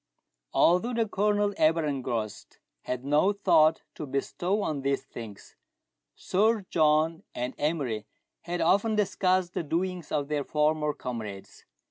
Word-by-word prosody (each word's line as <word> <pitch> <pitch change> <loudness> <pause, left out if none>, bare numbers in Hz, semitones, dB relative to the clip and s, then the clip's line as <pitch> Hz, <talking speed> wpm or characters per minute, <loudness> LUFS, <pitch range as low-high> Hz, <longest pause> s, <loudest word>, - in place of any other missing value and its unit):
Although 200 +8 +3
the 230 -1 +1
Colonel, 205 0 +1
ever 160 +1 +3
engrossed, 125 -7 -4 0.3
had 125 +1 -4
no 150 +8 +3
thought 160 -5 +3
to 150 - -7
bestow 175 +9 -1
on 145 -3 -2
these 140 0 0
things, 110 -4 -10 0.6
Sir 215 +1 +1
John 155 +1 +3
and 125 +1 -3
Emery 140 -9 -1 0.3
had 175 0 -4
often 205 +6 +3
discussed 185 -2 +1
the - - -1
doings 175 +2 -3
of 145 -2 -1
their 150 -1 -1
former 150 +1 +1
comrades. 110 -6 -7
155 Hz, 130 wpm, -28 LUFS, 140-185 Hz, 0.6 s, Although